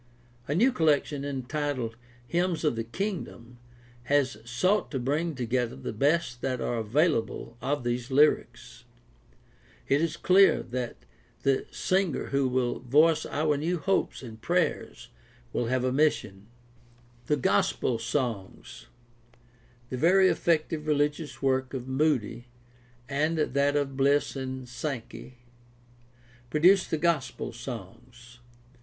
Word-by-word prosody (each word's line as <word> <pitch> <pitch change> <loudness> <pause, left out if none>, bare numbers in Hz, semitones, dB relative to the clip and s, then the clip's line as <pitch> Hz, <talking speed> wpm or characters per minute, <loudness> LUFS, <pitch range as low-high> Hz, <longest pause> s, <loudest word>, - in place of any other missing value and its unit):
A 145 - -1
new 240 +9 +4
collection 150 - +1
entitled 135 -3 -3 0.3
Hymns 175 +1 0
of 150 -6 +2
the 115 - -2
Kingdom 125 - -5 0.5
has 135 -2 +1
sought 185 - +1
to 140 - -3
bring 150 +6 -1
together 125 - -1
the 65 - -6
best 140 0 +1
that 130 -2 -1
are 120 - -2
available 120 0 0
of 145 -1 -1
these 120 0 -2
lyrics. 145 +3 +1 1.0
It 140 +2 +3
is 165 - -1
clear 195 +1 +5
that 125 - -5 0.4
the 135 -1 +1
singer 185 -5 -1
who 140 -1 +1
will 125 -1 0
voice 155 +5 +3
our 150 0 0
new 170 +5 -1
hopes 190 -4 -1
and 110 -3 -10
prayers - - -1 0.4
will 120 - -1
have 130 +1 0
a 130 - +1
mission. 110 -9 0 0.8
The 150 - +2
gospel 115 0 +1
songs. 115 -5 -4 0.5
— 120 0 -31
The 130 - -2
very 185 +6 +5
effective 155 -2 0
religious 150 0 -1
work 130 0 0
of 130 -1 -5
Moody, 130 -4 0 0.6
with 150 +1 0
that 140 +1 +2
of 140 -2 -1
Bliss 140 +2 +2
and 130 -1 -5
Sankey, 125 -1 -6 1.1
produced 180 +6 +4
the 160 - 0
gospel 150 -8 -1
songs. 120 +1 -10
135 Hz, 125 wpm, -28 LUFS, 120-155 Hz, 1.1 s, clear